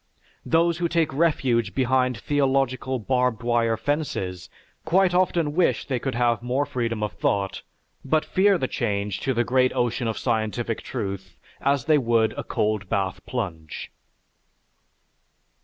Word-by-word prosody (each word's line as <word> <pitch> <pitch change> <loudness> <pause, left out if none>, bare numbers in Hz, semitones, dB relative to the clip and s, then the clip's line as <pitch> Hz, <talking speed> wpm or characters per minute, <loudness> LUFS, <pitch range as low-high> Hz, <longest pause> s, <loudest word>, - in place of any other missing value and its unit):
Those 170 0 +2
who 175 - +1
take 165 -4 +1
refuge 130 -8 +1
behind 130 -1 +2
theological 135 -1 0
barbed 125 0 0
wire 115 -1 +2
fences, 110 - -3 0.3
quite 180 +3 +3
often 175 -4 +2
wish 175 +2 +2
they 130 -3 -1
could 135 -1 -3
have 120 -1 +2
more 125 +4 0
freedom 115 -5 -2
of 105 - -1
thought, 100 -2 -1 0.4
but 155 +3 +1
fear 195 +1 +3
the 130 - -1
change 100 -5 -2
to 135 - -1
the 120 - +2
great 130 +2 +2
ocean 120 0 0
of 110 - -2
scientific 115 -1 -1
truth 95 -2 -5 0.2
as 140 -2 +1
they 155 -1 +4
would 115 -3 +2
a - - -5
cold 105 -3 -1
bath 95 -1 -1
plunge. 85 -11 -5
125 Hz, 140 wpm, -24 LUFS, 110-145 Hz, 0.4 s, they